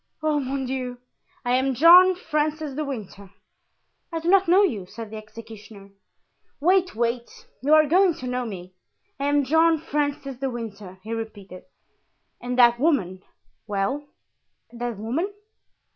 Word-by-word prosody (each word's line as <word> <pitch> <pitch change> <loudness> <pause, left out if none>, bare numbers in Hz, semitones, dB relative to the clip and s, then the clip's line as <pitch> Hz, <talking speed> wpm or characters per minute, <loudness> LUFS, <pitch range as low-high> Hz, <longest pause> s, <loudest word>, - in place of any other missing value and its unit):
"Oh, 305 -1 +1
mon 270 0 -3
Dieu!" 250 -1 -4 0.5
"I 245 - 0
am 260 +1 +1
John 360 +6 +8
Francis 305 -3 -2
de 305 +3 -3
Winter." 210 -8 -7 0.8
"I 330 - -2
do 330 +2 -2
not 390 0 +4
know 370 +4 +5
you," 210 - -1
said 220 +2 -9
the 220 - -6
executioner. 215 -2 -12 0.7
"Wait, 365 - +2
wait; 235 +1 -1 0.3
you 295 +4 +4
are 310 0 +6
going 355 +2 +3
to 255 - -9
know 250 0 -2
me. 185 -5 -8 0.5
I 280 - -2
am 290 0 +2
John 320 +3 +4
Francis 285 -3 -3
de 270 +1 -2
Winter," 210 -6 -8
he 220 +2 -5
repeated, 205 -5 -8 0.8
"and 245 +1 -4
that 240 -1 +5
woman——" 210 - 0 0.5
"Well, 220 +9 -2 0.6
that 240 -2 -5
woman?" 265 - -2
255 Hz, 145 wpm, -24 LUFS, 220-310 Hz, 0.8 s, John